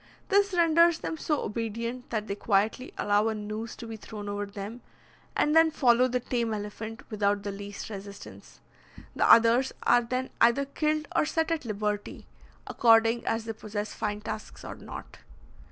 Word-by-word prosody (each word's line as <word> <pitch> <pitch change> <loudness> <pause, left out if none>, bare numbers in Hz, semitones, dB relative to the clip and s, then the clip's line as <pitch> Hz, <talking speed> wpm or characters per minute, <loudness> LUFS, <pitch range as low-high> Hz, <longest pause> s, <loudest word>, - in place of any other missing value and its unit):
This 400 -1 +3
renders 335 0 +5
them 325 - -4
so 305 -1 -1
obedient, 230 +3 -4
that 215 -2 -2
they 200 - -3
quietly 210 +5 0
allow 205 +1 +2
a 220 - 0
noose 215 +2 -5
to 235 - -9
be 225 -1 -7
thrown 210 -1 -8
over 205 0 -3
them, 205 +4 -7 0.6
and 300 +1 +2
then 325 0 +7
follow 250 -4 +4
the 250 0 0
tame 235 -2 -1
elephant 215 +2 -6
without 205 -1 +1
the 200 - -3
least 200 0 -7
resistance. 200 0 -10 0.5
The - - +4
others 230 +3 +6
are 245 - +5
then 255 +2 -3
either 235 +4 +5
killed 305 +2 -1
or - - +3
set 320 +1 0
at 320 -5 -1
liberty, 210 -1 -3 0.4
according 230 0 +4
as 225 0 0
they 225 - -3
possess 210 -1 -5
fine 210 0 -3
tusks 215 0 -7
or - - -5
not. - - -10
225 Hz, 170 wpm, -28 LUFS, 210-255 Hz, 0.6 s, then